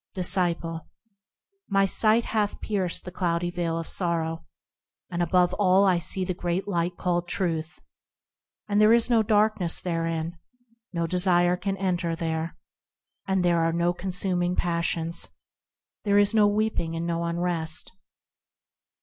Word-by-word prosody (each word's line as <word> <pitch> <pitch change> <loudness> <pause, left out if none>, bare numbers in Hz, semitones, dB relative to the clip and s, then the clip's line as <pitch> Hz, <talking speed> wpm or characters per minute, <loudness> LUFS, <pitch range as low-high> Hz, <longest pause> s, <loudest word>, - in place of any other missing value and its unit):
Disciple. 175 -3 0 0.8
My 195 -1 +3
sight 220 +4 +4
hath 210 -2 -1
pierced 190 -5 -1
the 180 - -6
cloudy 175 -1 -1
veil 170 -2 -2
of 165 - -5
sorrow, 165 -2 -1 0.6
And 175 0 -2
above 180 +1 +2
all 195 0 +4
I 185 -3 +3
see 185 +3 -1
the 185 - -2
Great 175 +2 -3
Light 175 -2 -1
called 175 -1 -1
Truth, 170 -2 -2 0.9
And 205 0 +2
there 215 +1 +6
is 235 +1 +3
no 230 -2 +5
darkness 210 -4 +1
therein, 165 -1 -3 0.5
No 170 -2 -1
desires 180 0 +2
can 195 -1 -2
enter 175 -3 -1
there. 165 0 -3 0.7
And 190 -2 +1
there 170 -1 +3
are 165 0 +2
no 170 +1 +1
consuming 180 -1 -2
passions; 170 -1 -1 0.8
There 205 -1 +2
is 205 +1 +4
no 215 -2 +5
weeping 205 -6 -1
and 165 +1 -3
no 170 0 -1
unrest. 170 -2 0
175 Hz, 140 wpm, -26 LUFS, 170-195 Hz, 0.9 s, there